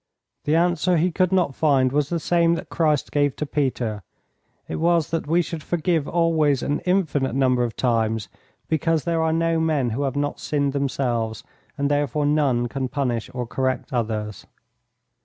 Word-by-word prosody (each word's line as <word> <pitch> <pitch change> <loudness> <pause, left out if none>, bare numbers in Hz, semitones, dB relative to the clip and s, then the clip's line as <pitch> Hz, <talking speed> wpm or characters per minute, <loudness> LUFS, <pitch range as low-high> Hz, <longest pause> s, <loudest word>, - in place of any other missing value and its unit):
The 150 - +2
answer 175 +1 +2
he 175 +3 +2
could 185 +2 +1
not 180 -7 +2
find 135 -3 +2
was 145 +1 0
the 170 - -1
same 170 +1 +2
that 165 - -7
Christ 155 -4 +1
gave 145 -2 +1
to 150 - -3
Peter. 125 -7 -2 0.7
It - - -4
was 170 -1 +2
that 165 -2 -2
we 170 +3 +3
should 165 -1 -6
forgive 165 -1 0
always 160 -5 +2
an 145 - 0
infinite 155 -9 +1
number 130 -2 +2
of 120 -2 -2
times 110 -4 0 0.4
because 160 0 +1
there 165 -1 0
are 160 0 +1
no 165 0 +1
men 150 -7 +1
who 125 +6 -2
have 140 -1 -1
not 145 0 -2
sinned 140 -2 -1
themselves, 120 -5 -1 0.3
and 140 0 0
therefore 145 0 0
none 145 -5 +2
can 130 +2 -3
punish 125 -4 -2
or 125 -1 -4
correct 130 +2 -2
others. 110 -4 -3
145 Hz, 175 wpm, -23 LUFS, 130-165 Hz, 0.7 s, we